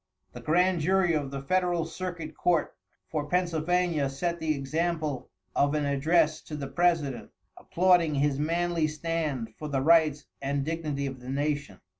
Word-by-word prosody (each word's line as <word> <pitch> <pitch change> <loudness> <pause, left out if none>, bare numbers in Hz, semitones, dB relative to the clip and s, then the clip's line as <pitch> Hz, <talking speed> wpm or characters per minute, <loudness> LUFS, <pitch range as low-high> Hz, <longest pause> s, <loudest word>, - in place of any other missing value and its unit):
The - - -8
grand 180 +2 +2
jury 185 +1 +3
of 145 -3 -1
the 135 0 -6
federal 175 +1 +1
circuit 165 -2 -6
court 175 -3 +1 0.4
for 150 -2 -2
Pennsylvania 175 -3 +1
set 170 +5 -2
the 155 -1 0
example 155 -1 -2 0.3
of 145 +1 +2
an 150 -1 0
address 155 +3 +2
to 155 - -6
the 145 -2 -4
president, 165 -7 0 0.3
applauding 175 -3 +2
his 140 0 +1
manly 170 +1 +1
stand 155 -7 -3
for 155 - -5
the 140 -2 -1
rights 155 -1 +4 0.2
and 140 0 -1
dignity 155 -3 -2
of 135 -1 -5
the 125 +1 -9
nation. 145 -6 -2
155 Hz, 155 wpm, -28 LUFS, 140-170 Hz, 0.4 s, rights